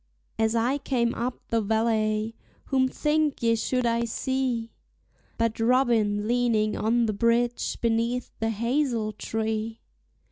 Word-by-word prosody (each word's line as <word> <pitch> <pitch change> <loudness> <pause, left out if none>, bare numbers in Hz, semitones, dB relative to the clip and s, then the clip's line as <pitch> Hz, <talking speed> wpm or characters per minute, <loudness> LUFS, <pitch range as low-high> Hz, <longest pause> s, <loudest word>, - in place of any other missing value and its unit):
As 220 +1 +2
I 245 +5 +1
came 240 -4 0
up 245 +2 -3
the 230 -1 +1
valley, 220 0 0 0.3
whom 260 -1 +2
think 300 0 0
ye 230 0 +4
should 250 +2 0
I 235 0 +1
see 245 -1 -2 0.7
But 230 -1 0
Robin 225 -4 +2
leaning 230 -3 +1
on 235 +2 +2
the 215 - 0
bridge 235 +3 +1
beneath 230 +1 0
the 225 - 0
hazel 235 0 0
tree? 220 +1 -3
230 Hz, 130 wpm, -26 LUFS, 220-245 Hz, 0.7 s, ye